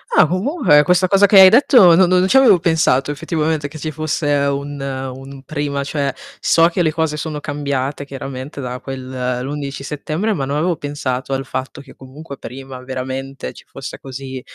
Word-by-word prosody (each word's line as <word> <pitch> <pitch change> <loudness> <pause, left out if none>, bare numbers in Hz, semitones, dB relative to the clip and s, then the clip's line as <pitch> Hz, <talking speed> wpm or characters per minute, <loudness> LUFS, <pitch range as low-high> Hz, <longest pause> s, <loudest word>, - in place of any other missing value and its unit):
Ah, 155 - +6
comunque 185 - +3
questa 180 +2 +3
cosa 195 +2 +5
che 195 0 +6
hai 190 -1 +10
detto 235 - +6
no 185 +1 +5
no 180 +1 +3
non 185 - +2
ci 265 - +4
avevo 250 -9 +6
pensato 155 -5 +2
effettivamente 155 -1 -2
che 155 +2 -11
ci 155 - -4
fosse 155 0 -3
un 140 0 -1
un 135 0 -6
prima. 145 0 -3
Cioè, 140 -1 -2 0.3
so 165 0 +4
che 180 - -1
le 160 - +1
cose 160 -1 -1
sono 150 0 -4
cambiate 140 -1 -3
chiaramente 135 0 -7
da 125 0 -5
quel 130 -1 -4
l'11 140 0 -5
settembre, 155 +9 -2
ma 140 -8 -2
non 140 +2 -2
avevo 170 +1 0
pensato 135 -2 -4
al 135 0 -2
fatto 135 +3 -5
che 135 - -16
comunque 140 +2 -11
prima 130 +1 -9
veramente 130 - -5
ci - - -15
fosse - - -8
così 130 0 -7
145 Hz, 185 wpm, -18 LUFS, 135-160 Hz, 0.3 s, hai